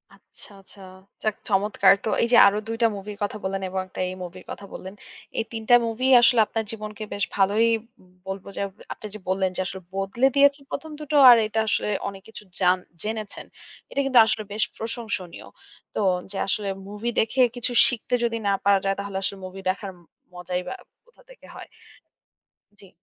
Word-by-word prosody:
আচ্ছা, - - -12
আচ্ছা। 195 +1 -16 0.4
যাক 215 -1 0
চমৎকার। 200 0 +4
তো - - 0
এই - - +2
যে - - +8
আরো 200 +1 +2
২ 225 0 -3
টা 230 - +6
মুভির 200 +1 -8
কথা 210 +1 -3
বললেন 195 0 -2
এবং 190 0 -2
১ 185 - -24
টা - - -3
এই 185 - -6
মুভির 180 +1 -10
কথা 200 - -8
বললেন। 190 +1 -8 0.5
এই - - +1
৩ 225 -1 -5
টা 245 - +9
মুভি 240 +4 -1
আসলে 245 -1 +5
আপনার 225 -1 -2
জীবনকে 215 -1 -7
বেশ 200 - -2
ভালোই 205 +3 +3 0.6
বলব, 195 0 -5
যে - - -2 0.3
আপনি 215 - -9
যে 215 - -7
বললেন 190 0 +1
যে - - -1
আসলে 190 +1 -6
বদলে 195 +7 +1
দিয়েছে 280 0 +5
১ম 315 +2 -5
দুটো 300 0 -4
আর 240 - +9
এটা 220 +1 -2
আসলে 210 - 0 0.2
অনেক 195 -1 -7
কিছু 215 - -10 0.2
জান 180 0 +4 0.3
জেনেছেন। 215 -1 -5 0.5
এটা - - -2
কিন্তু 255 -3 +5
আসলে 215 0 -1
বেশ 215 - +1
প্রশংসনীয়। 220 -6 -5 0.5
তো - - 0 0.3
যে 195 - -5
আসলে 205 +1 -1 0.2
মুভি 210 +4 -4
দেখে 255 +4 +1
কিছু 245 +1 -2 0.2
শিখতে 245 0 -3
যদি 230 -1 0
না 200 - +3
পারা 200 -1 +5
যায় 195 0 +1
তাহলে 200 -1 -4
আসলে 195 +1 -3
মুভি 190 +1 -9
দেখার 195 +1 -3 0.4
মজাই 180 0 -4
বা - - -4 0.3
কোথা 485 - -24
থেকে - - -16
হয়। - - -10 1.1
জ্বী। 195 - -15
210 Hz, 190 wpm, -24 LUFS, 195-230 Hz, 1.1 s, টা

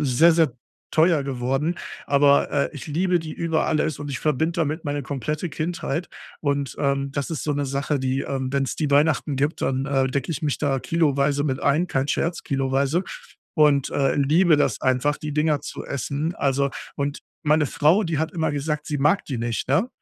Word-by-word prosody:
sehr, 150 +5 +5
sehr 160 -5 +3 0.4
teuer 160 -2 +4
geworden, 135 +5 -1 0.3
aber, 140 0 +4
äh, 140 -1 +1
ich 140 - -8
liebe 175 +4 +1
die 160 -2 -6
über 165 -2 0
alles 155 -1 0
und 145 -1 -6
ich 130 - -3
verbinde 155 +2 0
damit 155 +1 -1
meine 145 -1 -2
komplette 145 +6 -3
Kindheit. 165 +1 -3 0.3
Und, 140 -2 -1
ähm, 140 -1 0
das 140 +2 -3
ist 160 - -3
so 150 - 0
'ne 145 0 -1
Sache, 140 +2 -1
die, 130 +1 -1
ähm 130 -1 -3
wenn's 135 -2 -1
die 150 -3 -1
Weihnachten 145 -1 +2
gibt, 145 +4 -1
dann, 135 0 0
äh, 135 -2 +2
decke 135 +4 -2
ich 155 - -3
mich 145 -2 0
da 140 -3 0
kiloweise 145 -3 +1
mit 135 -3 -1
ein, 150 +5 +2
kein 135 -4 -1
Scherz, 170 +3 -1
kiloweise 135 +5 0 0.5
und, 150 -4 +4
äh, 135 -1 +1
liebe 155 +3 +4
das - - 0
einfach, 130 +3 +2
die 150 -1 -5
Dinger 150 -1 +1
zu - - -6
essen. 140 +5 -3
Also 140 0 +1 0.3
und 140 0 -3 0.2
meine 150 0 +3
Frau, 155 +8 +3
die 165 -4 -1
hat 160 +1 -1
immer 160 -3 0
gesagt, 150 +1 -2
sie 150 -3 -2
mag 150 +7 +2
die 130 -5 -4
nicht, 115 0 -2
ne? 145 - +2
145 Hz, 195 wpm, -23 LUFS, 135-155 Hz, 0.5 s, sehr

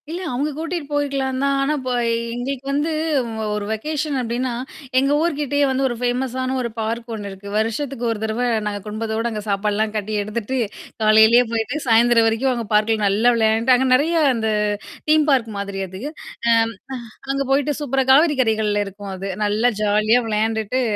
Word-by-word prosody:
இல்ல 345 +3 -4
அவுங்க 285 +5 -1
கூட்டிட்டு 330 0 -3
போயிருக்கலாம் 275 -2 -1
தான். 275 0 +2
ஆனா, 290 +2 +1
இப்ப 255 -1 -4 0.4
எங்களுக்கு 260 +2 -4
வந்து 295 +3 0 0.6
ஒரு 210 -1 -3
வெகேஷன் 300 +6 -2
அப்பிடின்னா, 245 +1 -2 0.5
எங்க 275 +1 +1
ஊர்கிட்டயே 290 -3 +1
வந்து 265 +1 0
ஒரு 240 - -3
ஃபேமஸான 255 +1 -1
ஒரு 235 - -2
பார்க் 230 +2 -3
ஒன்னு 205 -2 -5
இருக்கு. 195 +1 -11
வருஷத்துக்கு 240 +3 -2
ஒரு 225 - -3
தடவ 220 +3 -1 0.2
நாங்க 205 -1 -3
குடும்பத்தோட 220 +2 -2
அங்க 215 -1 -4
சாப்பாட்லாம் 210 +2 0
கட்டி 215 0 -3
எடுத்துட்டு 215 +5 -3 0.4
காலையிலேயே 220 +3 +6
போயிட்டு 225 +4 -1
சாயந்திரம் 230 0 +5
வரைக்கும் 230 +4 +1
அங்க 235 -2 -3
பார்க்க்ல 215 +1 +3
நல்லா 210 +5 +3
விளையாண்டுட்டு 225 +3 +3
அங்க 260 +1 +1
நெறைய 300 +6 +3 0.2
அந்த 225 -2 -1 0.6
தீம் 310 -1 +4
பார்க் 245 -5 +2
மாதிரி 200 -1 -4
அது. 185 +2 -9 0.5
அம், 225 0 +3 0.6
அ - - -12
அங்க 275 0 0
போயி்ட 285 +1 +2
சூப்பரா 270 -2 0
காவிரி 295 +2 +5
கரைகள்ல 215 -3 +1
இருக்கும் 200 0 -8
அது. 195 +1 -5
நல்லா 215 +4 +2
ஜாலியா 215 +3 +3
விளையாண்டுட்டு 220 +2 0
235 Hz, 165 wpm, -21 LUFS, 215-270 Hz, 0.6 s, காலையிலேயே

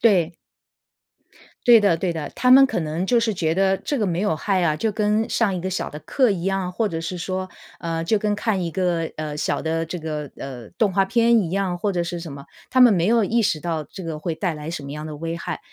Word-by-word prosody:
对。 180 -7 +3 1.3
对 235 -2 +8
的 200 -5 +3
对 175 0 -1
的， 155 -3 -5
他 250 - +2
们 270 +1 +9
可 255 - -2
能 160 +4 -2
就 240 +2 +3
是 230 -1 +1
觉 165 -3 0
得 195 0 +3
这 280 +7 -2
个 210 - +1
没 175 0 -1
有 205 -6 +1
害 190 +1 0
啊， 155 -3 +2
就 220 +3 -1
跟 210 +1 +1
上 210 -5 +1
一 - - -2
个 190 - -2
小 185 - -2
的 150 - -8
课 255 - +2
一 180 -4 -2
样， 195 -1 -1
或 215 +5 -1
者 165 -5 -3
是 170 +2 -4
说， 185 +2 -3 0.3
呃， 165 -1 -2
就 215 +4 +2
跟 210 0 0
看 205 -3 -1
一 170 - -2
个， 175 -2 -1
呃， 155 -1 -4
小 150 - -1
的 165 0 -1
这 175 +2 -5
个， 150 -3 -5
呃， 125 -5 -8
动 205 -4 +2
画 195 0 +2
片 235 +2 +4
一 175 - -2
样， 185 -2 -1
或 205 +2 0
者 175 -2 -1
是 170 0 -4
什 165 - -7
么， 140 0 -9 0.2
他 255 -1 +4
们 240 -4 +8
没 175 -1 +2
有 230 0 +4
意 230 +4 +1
识 160 -7 +1
到 165 -2 -2
这 185 +3 -10
个 160 -2 -4
会 165 +1 -3
带 180 0 -1
来 150 +1 -6
什 170 -4 -5
么 140 - -8
样 150 +1 -6
的 150 - -7
危 165 +2 -4
害。 - - -4
180 Hz, 280 characters per minute, -22 LUFS, 165-205 Hz, 1.3 s, 们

